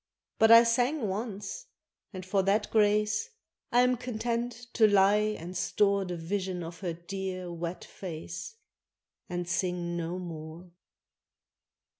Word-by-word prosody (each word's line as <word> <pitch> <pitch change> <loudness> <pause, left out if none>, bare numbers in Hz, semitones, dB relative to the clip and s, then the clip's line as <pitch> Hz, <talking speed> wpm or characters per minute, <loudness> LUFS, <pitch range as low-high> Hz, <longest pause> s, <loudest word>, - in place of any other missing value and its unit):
But 220 - +6
I 230 +1 +10
sang 245 +2 +1
once 210 - -5 0.4
and 185 -3 -7
for 195 +1 +2
that 200 +2 +1
grace 210 -1 +2 0.4
I 245 - +5
am 250 0 +3
content 240 0 -3
to 220 -3 +6
lie 210 +1 +4
and 175 +3 -8
store 200 +1 +2
The 180 -1 -4
vision 185 +1 -3
of 165 0 -8
her 175 -2 -3
dear, 185 +1 -5
wet 170 +1 -5
face, 170 - -7 0.7
And 175 -1 -3
sing 175 0 -1
no 170 +1 -3
more. 170 0 -8
195 Hz, 130 wpm, -29 LUFS, 175-220 Hz, 0.7 s, I